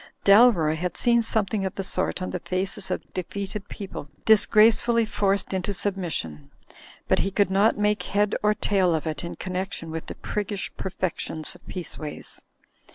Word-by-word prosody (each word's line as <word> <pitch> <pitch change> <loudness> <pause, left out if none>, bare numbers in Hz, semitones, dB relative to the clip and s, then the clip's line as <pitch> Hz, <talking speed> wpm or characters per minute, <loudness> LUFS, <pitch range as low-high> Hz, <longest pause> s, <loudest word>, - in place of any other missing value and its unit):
Dalroy 200 -7 +6
had 175 +1 -3
seen 235 -1 +4
something 215 -2 -1
of 190 - -3
the 195 - -3
sort 185 -1 +2
on - - -4
the 180 - -3
faces 185 +3 -3
of 185 - -5
defeated 200 +2 -5
people 190 -7 -7 0.2
disgracefully 225 +2 +5
forced 200 -2 0
into 190 +2 -1
submis 190 -4 -1
sion, 75 -3 -5 0.6
but - - +2
he 195 - +1
could 200 -1 +1
not 200 +3 +3
make 210 -1 +1
head 205 +3 0
or 210 0 +2
tail 190 -6 +2
of 160 - -3
it 155 -1 -3
in 170 - -5
connection 185 -3 -4
with 160 0 -6
the - - -6
priggish 205 -1 -4
perfections 185 -4 -2
of - - -17
Peaceways. 160 -4 -6
195 Hz, 165 wpm, -25 LUFS, 180-210 Hz, 0.6 s, Dalroy